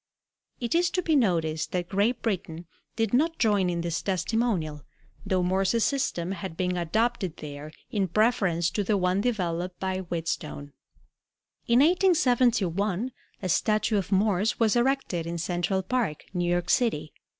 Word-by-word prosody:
It 235 -2 -2
is 345 +1 +3
to 365 - +1
be 320 -2 +2
noticed 165 - +1
that 175 -1 -1
Great 205 +7 0
Britain 175 -6 -3 0.3
did 225 -1 -1
not 325 +6 +2
join 205 -5 +2
in 170 -1 -1
this 170 0 -2
testimonial, 190 -6 -1 0.5
though 185 -2 +1
Morse's 190 +5 +1
system 190 -11 -1
had 190 -3 -6
been 180 -1 0
adopted 190 +1 -1
there 150 0 -8 0.2
in 200 -3 0
preference 185 -5 +2
to 205 - -1
the 205 +1 +1
one 185 +1 +1
developed 180 -6 -2
by 190 0 -2
Wheatstone. 165 -5 -4 0.9
In 240 +1 +5
1871 245 - +2 0.3
a 185 - -1
statue 215 +4 +2
of 190 0 -5
Morse 200 +2 +2
was 225 -1 +3
erected 240 -9 0
in 170 0 -3
Central 175 +3 -1
Park, 200 -7 -2
New 175 -1 0
York 175 0 0
City. 155 - +1
190 Hz, 150 wpm, -27 LUFS, 175-230 Hz, 0.9 s, In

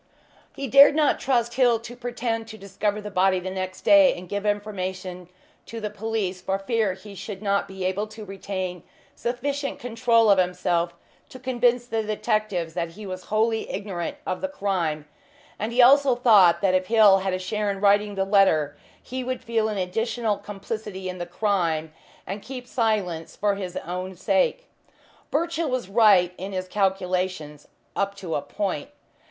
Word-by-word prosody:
He 275 - -5
dared 280 +4 +8
not 305 -2 +3
trust 240 -3 +1
Hill 245 -3 +4
to 240 +1 -9
pretend 240 -2 -3
to 220 -1 -9
discover 205 +1 -2
the 210 0 -7
body 190 0 +3
the 185 +1 -5
next 185 0 -5
day 295 -3 +6
and 180 +1 -9
give 205 +3 -3
information 185 -3 -3 0.4
to 230 - -6
the 210 -1 -4
police, 210 -4 -3
for 190 +1 -1
fear 210 0 0
he 200 +2 -12
should 200 +1 -7
not 200 -1 +1
be 190 -1 -6
able 195 +3 -1
to 215 0 -10
retain 185 -2 -5 0.3
sufficient 275 +4 -3
control 230 -2 +3
of 195 - +5
himself 175 -1 0 0.3
to - - -10
convince 245 -1 +1
the 225 -2 -1
detectives 215 -5 -1
that 170 +1 -2
he 210 +3 -10
was 185 -1 -6
wholly 220 +1 0
ignorant 190 -4 -4
of 185 - -3
the 285 - -1
crime, 180 - -2 0.5
and 215 +3 -2
he 245 +1 +5
also 275 0 +6
thought 210 -8 +5
that 195 -2 +2
if 185 0 +1
Hill 215 -4 +6
had 190 0 -2
a - - 0
share 205 +3 -2
in 195 -1 -2
writing 205 +1 +3
the 195 0 0
letter 175 -8 +3 0.3
he 255 0 -5
would 255 +1 -4
feel 225 -1 0
an 210 - -3
additional 220 +4 -1
complicity 205 -1 -6
in 180 0 -6
the 175 - -4
crime, 175 -5 -1 0.3
and 200 +2 -5
keep 255 +1 -8
silence 210 -10 -1
for 205 0 +1
his 190 -3 -5
own 180 +2 -5
sake. 195 - +1 0.6
Birchill 335 +1 -1
was 250 -7 -2
right 195 -5 +5
in 195 +2 -5
his 185 0 -3
calculations 185 -6 -1 0.3
up 200 0 -1
to 185 -5 -6
a - - 0
point. 195 - -3
200 Hz, 175 wpm, -24 LUFS, 185-230 Hz, 0.6 s, dared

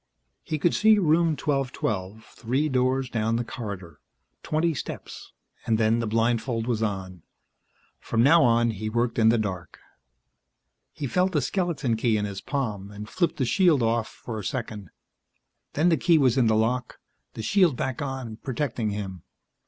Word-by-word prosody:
He 155 -4 -3
could 170 +3 +2
see 215 0 +5
Room 165 -3 +2
1212, 110 -8 -2
three 130 +6 -2
doors 130 0 +1
down 115 -1 -1
the 120 - 0
corridor, 100 - -7 0.4
twenty 160 +2 0
steps 140 - -7 0.4
and 115 -1 +3
then 110 +1 +2
the 115 - -2
blindfold 115 +1 0
was 115 -3 -1
on. 95 -4 -3 0.8
From 115 0 0
now 165 +5 +6
on 120 -1 +3
he 110 0 -4
worked 120 +1 0
in 110 0 +5
the 115 - +4
dark. 95 -7 -4 1.1
He 150 - -6
felt 180 +7 +1
the 150 - +3
skeleton 150 - -1
key 110 -1 +2
in 105 - -1
his 100 -1 -6
palm 105 -9 -3
and 105 +1 -8
flipped 170 +9 -1
the 130 - +1
shield 160 -2 +3
off 115 0 +1
for 110 -3 -7
a - - -6
second; 105 -4 -5 0.8
then 160 +5 +3
the 165 - +3
key 170 +3 +4
was 130 -5 +3
in 130 -4 +3
the 110 - +3
lock, 120 +3 0 0.4
the 110 - -5
shield 180 - +3
back 130 0 -3
on, 130 -5 -5
protecting 120 -3 -2
him. 100 -4 -5
120 Hz, 170 wpm, -26 LUFS, 110-140 Hz, 1.1 s, now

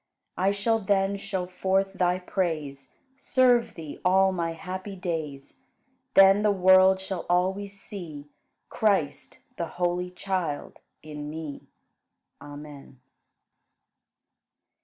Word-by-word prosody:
I 190 +2 +2
shall 210 +3 +1
then 195 -1 +1
show 195 -2 -3
forth 190 +1 0
Thy 180 -1 +1
praise, 160 -7 -3 0.2
Serve 250 -3 +3
Thee 155 -3 -8
all 190 +1 +4
my 170 -2 -2
happy 185 +4 -6
days; 160 - -5 0.6
Then 195 +1 +7
the 210 - +3
world 190 0 +5
shall 190 -1 -5
always 190 +3 0
see 160 -10 -8 0.4
Christ, 175 -10 0 0.2
the 170 - -2
holy 180 0 0
Child, 180 -5 -4 0.2
in 150 -1 -7
me. 155 -2 -7 0.7
Amen. 145 -2 -11
185 Hz, 105 wpm, -26 LUFS, 160-195 Hz, 0.7 s, Then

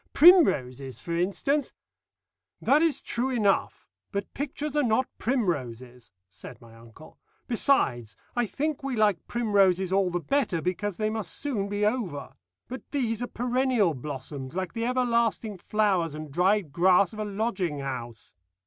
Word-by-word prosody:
Primroses, 140 - +5
for 170 - -4
instance 225 - 0 0.4
" - - -62
"That 290 +3 +6
is 330 -3 +1
true 245 +3 -1
enough, 215 -6 0 0.2
but 200 -1 -4
pictures 295 +1 -4
are 295 - +3
not 250 0 +2
primroses," 130 - -2 0.2
said 110 +5 -12
my 115 -2 -16
uncle. 115 +7 -16 0.3
"Besides, 125 - +1 0.2
I 240 -2 +1
think 300 +5 -2
we 270 -2 -3
like 210 -4 +1
primroses 195 -5 +2
all 195 -1 +3
the 175 0 -1
better 250 - 0
because 180 +3 -2
they 215 0 0
must 220 -2 -3
soon 220 -9 -2
be 205 +1 0
over; 210 - -2 0.3
but 255 +2 -6
these 240 -5 -1
are 245 - -2
perennial 245 -7 +1
blossoms, 135 +1 -7
like 185 -1 -3
the 230 -1 -2
everlasting 235 -5 0
flowers 190 -7 0
and 155 -1 -7
dried 180 +1 +2
grass 180 +3 +4
of 215 - -9
a - - -1
lodging 200 -6 -2
house. 120 -4 -6
200 Hz, 150 wpm, -27 LUFS, 155-245 Hz, 0.4 s, That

